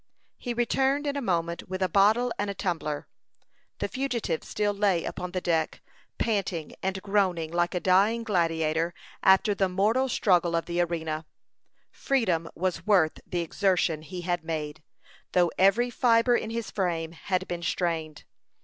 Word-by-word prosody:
He 240 -1 -4
returned 270 +4 +1
in 285 -1 -1
a 280 - -2
moment 170 -6 -2
with 185 0 -2
a - - +3
bottle 215 +7 +3
and 205 0 -1
a 200 - -4
tumbler. 165 -6 -3 0.7
The - - -2
fugitive 245 -11 -2
still 205 -1 -1
lay 200 -4 +1
upon 180 0 -4
the 185 0 -2
deck, 165 -2 0 0.4
panting 195 -8 -1
and 190 0 -2
groaning 185 -6 +1
like 175 +1 0
a - - +1
dying 200 +6 +3
gladiator 165 -4 0 0.3
after 190 +2 +5
the 195 -1 +1
mortal 220 +8 +2
struggle 175 -7 +2
of 165 - 0
the 175 0 0
arena. 160 -2 -2 0.6
Freedom 185 -12 0
was 185 +3 -2
worth 180 -7 +3
the 175 - -1
exertion 170 -2 +1
he 180 +3 -7
had 175 -1 -2
made, 155 -2 -4 0.5
though 175 -2 +3
every 210 +6 +4
fibre 235 0 +3
in 220 - -2
his 230 0 -4
frame 170 -4 -1
had 185 +2 -2
been 175 -1 -4
strained. 165 -3 -2
185 Hz, 160 wpm, -27 LUFS, 165-210 Hz, 0.7 s, after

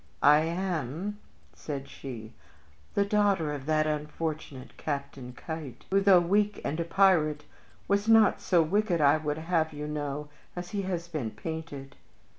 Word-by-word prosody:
"I 150 +1 +7
am," 170 +2 -2 0.3
said 140 -2 -6
she, 115 -4 -8 0.6
"the 200 - +3
daughter 200 -7 +2
of 140 -1 -7
that 155 0 +2
unfortunate 150 -2 -4
Captain 140 -4 -5
Keitt, 155 +1 -7
who, 195 +1 +4
though 195 -2 +7
weak 205 +4 +1
and 155 - -2
a - - +1
pirate, 165 -5 +3 0.4
was 200 +1 +1
not 225 -2 +5
so 175 -3 +3
wicked, 190 +1 +1
I 145 0 +5
would 150 -1 -2
have 160 -1 0
you 150 0 -5
know, 150 -1 -3 0.3
as 175 0 -6
he 205 - -1
has 170 -2 -3
been 155 -9 -3
painted. 140 +3 -7
160 Hz, 150 wpm, -29 LUFS, 145-185 Hz, 0.6 s, I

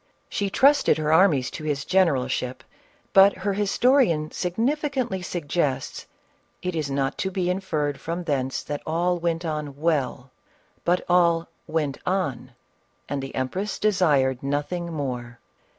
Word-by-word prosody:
She 200 -1 -1
trusted 280 +4 +4
her 155 0 +1
armies 160 -8 +4
to - - -7
his 145 -2 -2
generalship; 135 -8 +1 0.5
but 195 +1 +7
her 195 +2 -2
his 205 0 0
torian 235 - +3
significantly 245 - -1
suggests, 150 -6 -2 0.3
" - - -41
it 180 -1 -2
is 155 -3 -2
not 135 0 -1
to 190 - 0
be 180 -1 0
inferred 155 -7 -2
from 170 +2 -4
thence 135 -5 -1
that 145 -1 -4
all 175 +2 +1
went 170 0 -1
on 150 -3 -4
well, 140 -5 -1 0.5
but 175 +1 +1
all 170 -2 +3 0.2
ivent 150 -4 -1
on 180 -10 -2 0.5
and 140 -1 -2
the 135 - -7
empress 185 +11 -2
desired 150 -11 +2
nothing 145 +5 -2
more." 125 -6 -4
165 Hz, 140 wpm, -24 LUFS, 140-185 Hz, 0.5 s, but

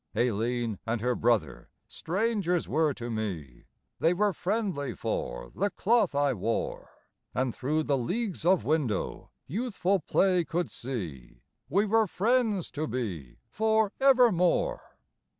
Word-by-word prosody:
Aileen 115 -1 0
and 115 0 0
her 125 +1 +1
brother, 115 - 0 0.2
strangers 190 -2 -1
were 155 0 +2
to 120 -3 -6
me; 90 - -5 0.3
They 170 +2 +3
were 205 +1 +2
friendly 185 - -2
for - - -4
the 200 +2 0
cloth 210 -5 +2
I 145 -1 +2
wore; 115 +1 -3 0.5
And 130 -1 0
through 155 +4 -1
leagues 175 - -1
of 180 +1 +3
window, 145 -10 -1 0.2
youthful 200 - 0
play 180 +2 +2
could 170 +1 -2
see 90 - -6 0.3
We 200 +8 +3
were 220 +1 +3
friends 215 -1 +1
to 155 +2 -3
be 90 - -4
for 220 -1 +2
evermore. 255 - +3
160 Hz, 125 wpm, -28 LUFS, -, 0.5 s, They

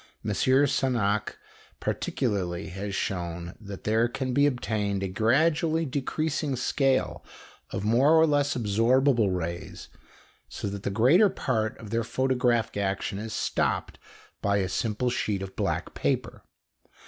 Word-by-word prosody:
M. 105 - -1
Sagnac, 130 -5 +1 0.4
particularly, 85 -5 -2
has 100 +2 -5
shown 85 -3 -3
that 100 -2 -9
there 110 +2 +2
can 130 +1 -3
be 140 +2 +4
obtained 105 -6 -1
a - - 0
gradually 155 - +2
decreasing 145 +1 -2
scale 130 +1 0 0.5
of 95 - -4
more 125 +8 +4
or 160 - +6
less 145 -2 +1
absorbable 115 +1 +3
rays, 85 -1 -5 0.6
so - - -5
that 100 0 -6
the - - -2
greater 130 - +5
part 110 - -1
of 105 -3 -10
their 115 0 +1
photographic 125 -3 0
action 100 0 -2
is 110 +1 -6
stopped - - -1 0.4
by 100 0 +2
a 95 -2 0
simple 115 +5 -1
sheet 100 -5 -1
of 95 - -8
black - - -2
paper. - - -2
115 Hz, 135 wpm, -27 LUFS, 100-130 Hz, 0.6 s, or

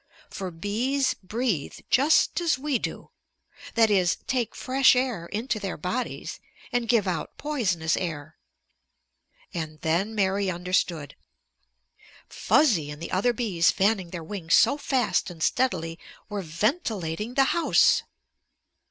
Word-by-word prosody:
For 190 -2 -5
bees 230 +11 0
breathe 205 - -3 0.2
just 295 +6 +4
as 335 -5 +2
we 275 -2 -1
do, - - -6 0.6
that 225 -2 +4
is, 185 -3 +3
take 245 -4 -1
fresh 265 0 +4
air 250 -9 -1
into 220 +3 -2
their 195 -3 -4
bodies 185 +11 -4 0.3
and 240 -2 -1
give 225 -5 +3
out 180 - -3
poisonous 185 - 0
air. 155 -4 -5 1.2
And 155 -2 -5
then 180 +7 0
Mary 195 -1 +1
understood. 175 -4 -1 1.1
Fuzzy 190 - +2
and 150 0 -8
the 170 - -6
other 200 +7 +2
bees 195 -9 +1
fanning 195 0 +1
their 170 -1 -6
wings 170 -2 0
so 280 - +5
fast 245 -11 0
and 165 -3 -6
steadily 165 -10 0 0.3
were 205 -1 -3
ventilating 210 - -2
the 275 - +5
house! 340 - +4
200 Hz, 125 wpm, -26 LUFS, 170-245 Hz, 1.2 s, so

